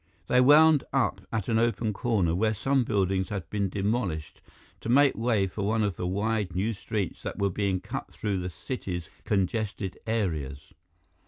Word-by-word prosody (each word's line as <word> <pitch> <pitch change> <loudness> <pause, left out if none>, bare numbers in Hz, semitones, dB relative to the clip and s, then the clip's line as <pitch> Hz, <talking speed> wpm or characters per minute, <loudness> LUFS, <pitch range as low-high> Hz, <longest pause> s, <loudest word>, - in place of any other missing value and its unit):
They 125 +6 +4
wound 150 +2 +7
up 120 -7 +1
at 110 -4 -2
an 115 -1 +2
open 115 -2 +1
corner 100 -7 +1
where 110 +5 +1
some 135 +3 +1
buildings 95 -4 0
had 100 -5 -4
been 100 -2 0
demolished 95 -6 -2 0.4
to - - -6
make 140 +2 +5
way 110 -3 +1
for 95 +2 -5
one 110 +2 +1
of 100 -4 0
the 90 - -3
wide 100 -1 -1
new 105 +5 0
streets 100 -2 -3
that - - -5
were 100 -1 +1
being 95 -1 0
cut - - -6
through 100 -3 -2
the 90 0 -3
city's 90 - -5
congested 100 -1 -1
areas. 80 -11 -2
105 Hz, 170 wpm, -27 LUFS, 95-115 Hz, 0.4 s, wound